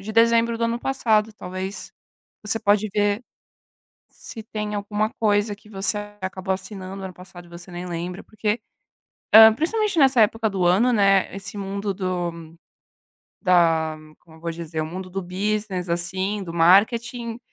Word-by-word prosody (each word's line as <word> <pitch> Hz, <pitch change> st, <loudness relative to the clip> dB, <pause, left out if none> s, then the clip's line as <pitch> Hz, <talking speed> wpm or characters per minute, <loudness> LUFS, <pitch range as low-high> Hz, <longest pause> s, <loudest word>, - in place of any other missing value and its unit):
de 215 Hz, +3 st, -7 dB
dezembro 230 Hz, 0 st, +3 dB
do 230 Hz, -, 0 dB
ano 230 Hz, +1 st, -1 dB
passado 225 Hz, -5 st, +1 dB
talvez, 190 Hz, 0 st, -6 dB, 0.5 s
você 220 Hz, +2 st, 0 dB
pode 210 Hz, 0 st, +2 dB
ver 205 Hz, +1 st, +1 dB, 0.9 s
se 225 Hz, -, -10 dB
tem 210 Hz, -1 st, -4 dB
alguma 210 Hz, +1 st, -1 dB
coisa 205 Hz, -1 st, +1 dB
que 210 Hz, +1 st, -20 dB
você 200 Hz, 0 st, -1 dB, 0.2 s
acabou 190 Hz, 0 st, -3 dB
assinando 190 Hz, 0 st, -7 dB
ano 185 Hz, -, -6 dB
passado 180 Hz, -1 st, -13 dB
e -, -, -18 dB
você 175 Hz, +2 st, -12 dB
nem 175 Hz, +1 st, -6 dB
lembra, 175 Hz, +1 st, -5 dB
porque, 215 Hz, +1 st, -2 dB, 0.7 s
hã, 220 Hz, 0 st, +10 dB
principalmente 395 Hz, -, 0 dB
nessa 265 Hz, -4 st, +5 dB
época 220 Hz, +1 st, +2 dB
do 190 Hz, -3 st, -1 dB
ano, 200 Hz, +8 st, +4 dB
né, 195 Hz, -4 st, +3 dB
esse 195 Hz, +1 st, -7 dB
mundo 200 Hz, 0 st, -3 dB
do 175 Hz, -4 st, -4 dB, 0.9 s
da, 165 Hz, -4 st, +3 dB, 0.2 s
como 160 Hz, -1 st, -19 dB
vou 170 Hz, 0 st, -3 dB
dizer, 165 Hz, -1 st, -5 dB
o 155 Hz, -, -1 dB
mundo 185 Hz, +3 st, -7 dB
do 195 Hz, +1 st, -4 dB
business, 190 Hz, 0 st, -2 dB
assim, 185 Hz, +4 st, -1 dB
do 170 Hz, -3 st, -7 dB
marketing 225 Hz, +7 st, +3 dB
200 Hz, 155 wpm, -23 LUFS, 180-220 Hz, 0.9 s, hã